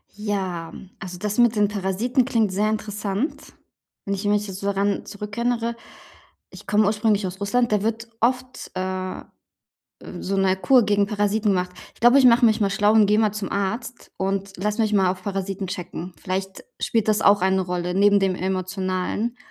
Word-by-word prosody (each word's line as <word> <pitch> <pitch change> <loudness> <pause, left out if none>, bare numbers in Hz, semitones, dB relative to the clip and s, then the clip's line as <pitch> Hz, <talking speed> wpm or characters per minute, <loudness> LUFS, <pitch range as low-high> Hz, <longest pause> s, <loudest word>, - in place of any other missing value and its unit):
Ja, 190 -5 -3 0.3
also 180 -2 -7
das 210 +1 -3
mit 240 -2 +4
den 210 -1 +3
Parasiten 210 +6 0
klingt 225 -6 +1
sehr 205 +3 +1
interessant. 210 +4 -3 0.5
Wenn 200 - -1
ich 195 +2 -6
mich 210 0 +1
jetzt 190 -1 -7
so 200 - -4
daran 200 0 0
zurückerinnere, 230 +3 -2 0.7
ich - - -13
komme 210 +1 +3
ursprünglich 210 -1 +1
aus 185 +1 -8
Russland, 240 +4 +1
da 210 -1 +1
wird 225 +1 -2
oft, 255 +2 -1
äh, 185 0 -3
äh, - - -11 1.0
so 195 +1 -2
'ne 190 -1 +2
Kur 250 +5 +4
gegen 205 -1 +2
Parasiten 210 +1 0
gemacht. 180 -2 0 0.2
Ich - - -25
glaube, 240 +3 +6
ich 270 - +4
mache 240 0 +6
mich 220 0 +2
mal 200 -2 +2
schlau 205 +2 +3
und 215 -2 +6
gehe 210 +1 +3
mal 215 -2 +2
zum 210 -2 -5
Arzt 225 +5 -4
und 195 0 -2
lass 210 +4 -2
mich 220 -2 +1
mal 190 -2 +4
auf 185 0 -5
Parasiten 195 0 -3
checken. 180 0 -6
Vielleicht 190 - -4 0.2
spielt 225 -2 0
das 215 0 +3
auch 200 -1 +5
eine 190 0 +2
Rolle 180 0 -3
neben 200 +1 +5
dem 190 -1 +1
emotionalen. 185 +4 -2
205 Hz, 185 wpm, -23 LUFS, 190-220 Hz, 1.0 s, glaube